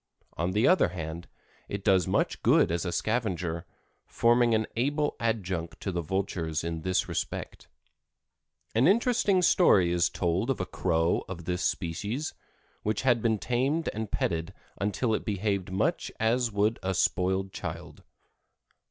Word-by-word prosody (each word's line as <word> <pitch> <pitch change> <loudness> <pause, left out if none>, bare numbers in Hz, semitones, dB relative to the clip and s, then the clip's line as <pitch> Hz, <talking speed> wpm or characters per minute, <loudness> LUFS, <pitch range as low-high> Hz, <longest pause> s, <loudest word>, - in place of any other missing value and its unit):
On 85 +3 -1
the 105 +5 +3
other 185 - +5
hand, 85 -1 -6 0.4
it 100 -1 -4
does 95 -4 +3
much - - 0
good - - +4
as 85 +1 -1
a 90 - -1
scavenger, 90 -7 -2 0.4
forming 120 0 +3
an 110 0 +1
able 145 +5 0
adjunct 95 -7 -2
to 95 - -2
the 85 -1 -2
vultures 85 -2 -2
in 85 -1 -3
this 95 +2 0
respect. 85 - -4 1.1
An 115 +6 +4
interesting 205 -3 +3
story 95 - +5
is 85 0 +2
told 90 +7 -1
of 135 - 0
a 95 - -1
Crow 85 -2 0
of 85 -3 -7
this 90 +1 -2
species 105 - -2 0.5
which 105 +3 -1
had 120 -3 +3
been 110 -1 +2
tamed 135 +9 0
and 110 -1 -4
petted 85 0 -2 0.2
until 105 +4 0
it - - -1
behaved 100 -3 -1
much 125 - 0
as 115 +1 +1
would 105 +2 +1
a 95 0 -1
spoiled 95 +1 +1
child. - - -7
100 Hz, 150 wpm, -28 LUFS, 90-115 Hz, 1.1 s, other